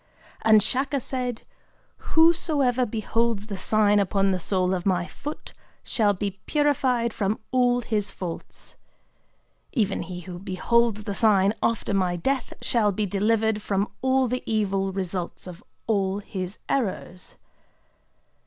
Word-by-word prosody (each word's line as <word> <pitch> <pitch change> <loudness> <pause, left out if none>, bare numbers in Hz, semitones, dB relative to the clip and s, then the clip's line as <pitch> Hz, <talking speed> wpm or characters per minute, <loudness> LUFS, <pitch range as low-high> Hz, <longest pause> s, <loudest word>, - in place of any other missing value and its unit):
And 215 -2 +6
Shaka 275 +2 0
said: 250 -2 -3 0.7
'Whosoever 300 -7 +4
beholds 225 0 -1
the 205 -3 -5
sign 210 0 +3
upon 195 0 +2
the 185 - 0
sole 185 +1 0
of 180 -2 -2
my 180 -3 +1
foot 295 - -8 0.3
shall 210 -3 +2
be 195 0 -4
purified 260 -6 +1
from 205 +1 0
all 245 -1 +3
his 215 -3 -1
faults. 175 -3 -7 1.0
Even 210 -7 0
he 180 -1 -6
who 175 0 -8
beholds 215 +4 +1
the 205 - -3
sign 200 -1 +4
after 225 -2 0
my 185 -2 +1
death 260 +8 -1
shall 215 -4 +2
be 210 +2 -1
delivered 215 +2 +1
from 200 0 -1
all 260 0 +3
the 250 +1 -2
evil 195 -3 0
results 185 -2 -4
of 180 +1 -10 0.2
all 195 -3 +1
his 190 -2 -5
errors." 190 -7 -3
210 Hz, 135 wpm, -25 LUFS, 190-240 Hz, 1.0 s, And